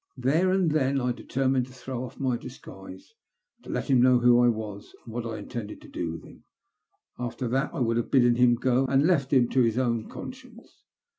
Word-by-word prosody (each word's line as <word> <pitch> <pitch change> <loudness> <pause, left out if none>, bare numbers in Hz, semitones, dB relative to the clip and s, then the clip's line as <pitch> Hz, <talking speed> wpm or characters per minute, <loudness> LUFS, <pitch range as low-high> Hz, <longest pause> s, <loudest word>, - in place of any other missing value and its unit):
There 150 +9 +2
and 185 -4 +2
then 140 -2 +1
I 125 -1 0
determined 130 +1 -1
to 130 - -15
throw 130 -1 -6
off 125 - -10
my 130 -3 0
disguise, 120 - -11 0.5
to - - -14
let - - -3
him 130 -4 +4
know 125 0 +5
who 120 0 +5
I 120 - +5
was, 110 -3 -4
and 115 - -10
what 120 0 -4
I 110 - -5
intended 105 0 -7
to - - -13
do 85 -1 -4
to - - -17
him; - - -17 0.8
after 125 +1 -4
that 135 +4 0
I - - -4
would 115 -1 +1
have 120 - -2
bidden 120 -3 +4
him 120 0 +4
go, 130 +2 +1
and 135 +1 +3
have - - +3
left 145 -8 +1
him 130 -4 +4
to 130 - +2
his 115 -1 +1
own 115 -3 -1
conscience. 250 -2 -11
125 Hz, 220 wpm, -26 LUFS, 120-135 Hz, 0.8 s, know